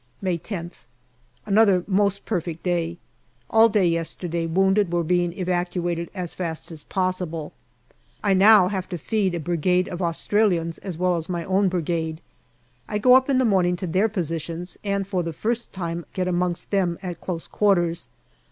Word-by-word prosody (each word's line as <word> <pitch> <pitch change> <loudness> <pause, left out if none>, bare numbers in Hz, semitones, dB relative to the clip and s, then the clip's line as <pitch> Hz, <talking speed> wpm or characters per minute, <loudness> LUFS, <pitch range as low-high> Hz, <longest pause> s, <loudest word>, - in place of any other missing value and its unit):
May 185 -3 -1
10th. 175 - -7 0.6
Another 200 -3 +4
most 200 0 +1
perfect 170 -5 -3
day. 170 -2 -1 0.5
All 225 0 +6
day 205 -3 +2
yesterday 165 0 -1
wounded 190 +2 +2
were 175 -1 +1
being 175 +1 +1
evacuated 175 -2 -2
as 180 -3 -4
fast 165 -2 -5
as 155 -2 -5
possible. 180 -4 -2 0.7
I 200 -2 +3
now 195 0 +7
have 190 -2 -3
to 180 - -3
feed 190 +2 0
a - - -2
Brigade 175 +3 +1
of 180 +1 -5
Australians 170 -1 +1
as 185 -5 -6
well 180 0 +1
as 165 +2 -5
my 170 -2 -2
own 190 +1 +2
Brigade. 165 -2 -2 0.7
I 210 - -1
go 250 +4 +5
up 260 +1 +5
in 270 - +3
the 260 - +3
morning 185 -5 +3
to 180 - -5
their 190 +6 +2
positions, 170 -2 -4
and 200 -1 -1
for 190 -2 -1
the 165 -1 -4
first 235 +8 -2
time 170 -2 -4
get 185 -1 -1
amongst 175 -1 -1
them 180 -4 +1
at 175 -2 -5
close 170 -3 -4
quarters. 175 -5 +1
180 Hz, 170 wpm, -24 LUFS, 170-195 Hz, 0.7 s, now